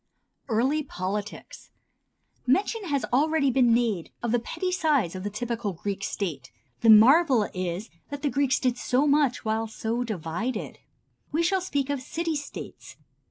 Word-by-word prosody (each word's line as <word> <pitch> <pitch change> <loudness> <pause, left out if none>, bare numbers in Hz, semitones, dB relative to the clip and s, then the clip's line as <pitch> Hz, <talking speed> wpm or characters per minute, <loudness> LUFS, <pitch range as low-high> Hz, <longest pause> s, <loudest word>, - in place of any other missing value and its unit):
Early 260 +7 +2
Politics. 205 -5 -5 0.8
Mention 405 - +1
has 285 -5 0
already 290 0 +3
been 245 -2 +4
made 230 -7 +1
of 235 - 0
the 240 - +3
petty 365 +10 -3
size 295 - +1
of 185 -1 -6
the 205 - -2
typical 230 -1 -3
Greek 195 +3 -4
State. 170 -11 -4 0.3
The 230 - +3
marvel 245 +2 +7
is 185 +3 -4 0.2
that 285 0 -6
the 290 - +2
Greeks 275 -2 +2
did 250 -1 0
so 260 +3 +1
much 285 -5 +2
while 220 +1 0
so 225 +2 -2
divided. 215 +3 -4 0.5
We 320 +3 +1
shall 380 +2 +2
speak 285 -6 -1
of 280 -2 -2
"city 325 +4 -3
states." 290 -1 -8
245 Hz, 155 wpm, -26 LUFS, 215-285 Hz, 0.8 s, marvel